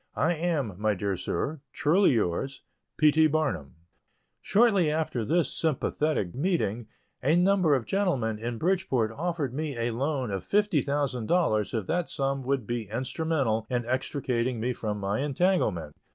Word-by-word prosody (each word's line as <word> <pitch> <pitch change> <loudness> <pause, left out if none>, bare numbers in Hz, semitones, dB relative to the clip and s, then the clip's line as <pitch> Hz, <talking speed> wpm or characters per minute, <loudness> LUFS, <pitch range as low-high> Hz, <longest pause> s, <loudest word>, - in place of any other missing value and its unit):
I 170 - +2
am, 150 - -2
my 105 -1 +2
dear 100 +1 -1
Sir, 135 - -3
truly 170 +2 +3
yours, 115 +6 -1 0.3
P. 155 -1 +5
T. 155 +1 +5
BARNUM. 135 - -1 0.7
Shortly 200 -7 +3
after 150 -6 -1
this 160 +3 +1
sympathetic 150 - 0
meeting, 130 - -1 0.3
a 145 +5 +3
number 180 -4 +4
of 125 -4 -2
gentlemen 135 - 0
in 120 +1 -4
Bridgeport 160 - +1
offered 155 -1 -2
me 150 -2 -3
a 115 +1 0
loan 130 -1 -1
of 95 -1 -3
$50,000 140 - +1
if 100 - -8
that 175 - -1
sum 135 -1 -1
would 135 -2 -1
be 120 -2 -3
instrumental 130 -2 -1
in 120 -2 -1
extricating 125 -1 -1
me 125 +3 -1
from 105 -3 -3
my 100 +2 -1
entanglement. 135 - 0
135 Hz, 145 wpm, -27 LUFS, 110-160 Hz, 0.7 s, P